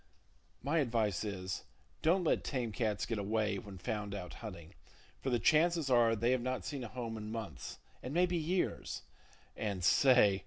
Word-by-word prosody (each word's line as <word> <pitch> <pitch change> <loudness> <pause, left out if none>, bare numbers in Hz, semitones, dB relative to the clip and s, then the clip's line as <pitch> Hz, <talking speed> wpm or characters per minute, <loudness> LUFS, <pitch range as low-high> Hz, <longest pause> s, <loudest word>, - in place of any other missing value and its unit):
My 150 +5 +2
advice 115 - +1
is, 95 -3 -3 0.4
don't 175 +4 +3
let 165 - +2
tame 125 -5 -2
cats 105 -3 0
get 115 -3 -2
away 105 +1 0
when 100 -4 -9
found 105 0 -3
out 90 -3 -6
hunting; 90 -8 -8 0.5
for 135 - -2
the 120 - +3
chances 155 +3 +3
are 115 -2 +5
they 115 +3 +2
have 130 -1 +2
not 130 -5 -2
seen 140 -3 -4
a - - -4
home 115 -1 -5
in 105 0 -6
months, 110 - -6 0.2
and 125 - -5
maybe 175 +3 +2
years,—and 155 - -3
say! 105 -2 +6
115 Hz, 165 wpm, -34 LUFS, 105-135 Hz, 0.5 s, say